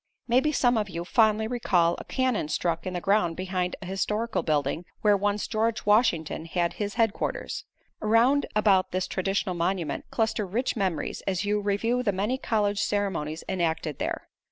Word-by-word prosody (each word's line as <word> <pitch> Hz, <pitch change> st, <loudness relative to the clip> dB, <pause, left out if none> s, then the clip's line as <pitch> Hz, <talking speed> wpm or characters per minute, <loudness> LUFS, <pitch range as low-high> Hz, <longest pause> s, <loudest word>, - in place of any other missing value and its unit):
Maybe 255 Hz, +5 st, +3 dB
some 245 Hz, -5 st, +3 dB
of 210 Hz, -1 st, -2 dB
you 170 Hz, -1 st, -5 dB
fondly 220 Hz, +2 st, +3 dB
recall 185 Hz, -8 st, +2 dB
a -, -, -7 dB
cannon 255 Hz, -, 0 dB
stuck 170 Hz, +2 st, -1 dB
in 185 Hz, -, -3 dB
the 175 Hz, -, -2 dB
ground 195 Hz, -5 st, +2 dB
behind 185 Hz, -1 st, -2 dB
a 190 Hz, -, -11 dB
historical 210 Hz, +5 st, -1 dB
building 150 Hz, +1 st, 0 dB, 0.2 s
where 210 Hz, -1 st, +5 dB
once 205 Hz, +1 st, 0 dB
George 220 Hz, +1 st, -1 dB
Washington 190 Hz, -8 st, +2 dB
had 170 Hz, 0 st, -1 dB
his 205 Hz, -1 st, -2 dB
headquarters. 225 Hz, -3 st, -1 dB, 0.4 s
Around 235 Hz, +6 st, +3 dB
about 200 Hz, -3 st, +4 dB
this 185 Hz, 0 st, 0 dB
traditional 195 Hz, 0 st, -1 dB
monument 170 Hz, -3 st, -1 dB
cluster 220 Hz, -2 st, 0 dB
rich 240 Hz, +9 st, -1 dB
memories 190 Hz, -7 st, -2 dB
as 195 Hz, +1 st, 0 dB
you 210 Hz, 0 st, +1 dB
review 215 Hz, +5 st, 0 dB
the 230 Hz, -5 st, +1 dB
many 210 Hz, +7 st, -1 dB
college 205 Hz, -4 st, 0 dB
ceremonies 190 Hz, -8 st, -1 dB
enacted 165 Hz, -4 st, -1 dB
there. -, -, -3 dB
200 Hz, 165 wpm, -27 LUFS, 180-220 Hz, 0.4 s, where